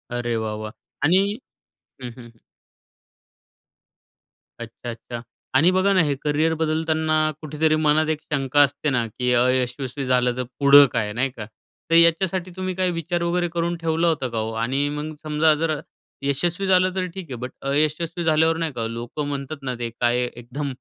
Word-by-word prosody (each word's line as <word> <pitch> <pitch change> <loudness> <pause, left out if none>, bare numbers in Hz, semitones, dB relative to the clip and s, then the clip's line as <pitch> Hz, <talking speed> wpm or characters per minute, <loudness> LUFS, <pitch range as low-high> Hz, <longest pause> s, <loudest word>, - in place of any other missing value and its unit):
अरे 120 -1 -1
वाह, 110 -1 -2
वाह! 110 0 -6 0.3
आणि 165 +5 +5 0.9
हं, 125 - -5
हं. 120 -2 -14 2.2
अच्छा, 115 +1 -8
अच्छा. 115 0 -7 0.3
आणि 150 +7 +5
बघा 185 +2 +2
ना, 185 - +5
हे 145 -2 0
करिअर 150 +2 +1
बदलताना 160 0 0 0.3
कुठेतरी 155 +1 +1
मनात 155 0 +2
एक 155 - 0
शंका 140 +1 +2
असते 145 +2 -1
ना, 125 -4 +1
की 125 +3 -2
अयशस्वी 130 +2 0
झालं 125 -1 +2
तर 125 - -1 0.2
पुढं 140 0 +8
काय? 105 -3 -1
नाही 130 +5 0
का. 110 -4 -8 0.4
तर 165 - +3
याच्यासाठी 170 +2 +3
तुम्ही 185 0 -3
काय 185 0 +1
विचार 170 +1 -2
वगैरे 175 0 0
करून 170 0 -1
ठेवला 165 +1 0
होतं 145 -6 0
का 115 - -5
हो? 110 +1 -2
आणि 135 +4 0
मग 155 +1 -4
समजा, 155 +1 +3
जर 155 -1 -1 0.4
यशस्वी 175 +8 0
झालं 185 0 +3
तर 185 - 0
ठीक 190 -1 -7
आहे. 125 - -3
बट 125 +1 -5 0.2
अयशस्वी 155 +4 0
झाल्यावर 160 +1 +3
नाही 165 -2 -1
का 115 -2 -3
लोकं 120 +6 -5
म्हणतात, 140 +1 -4
ना 130 -2 -3
ते 120 -1 -2
काय 120 +1 +2
एकदम 125 +5 -6
150 Hz, 170 wpm, -23 LUFS, 125-165 Hz, 2.2 s, पुढं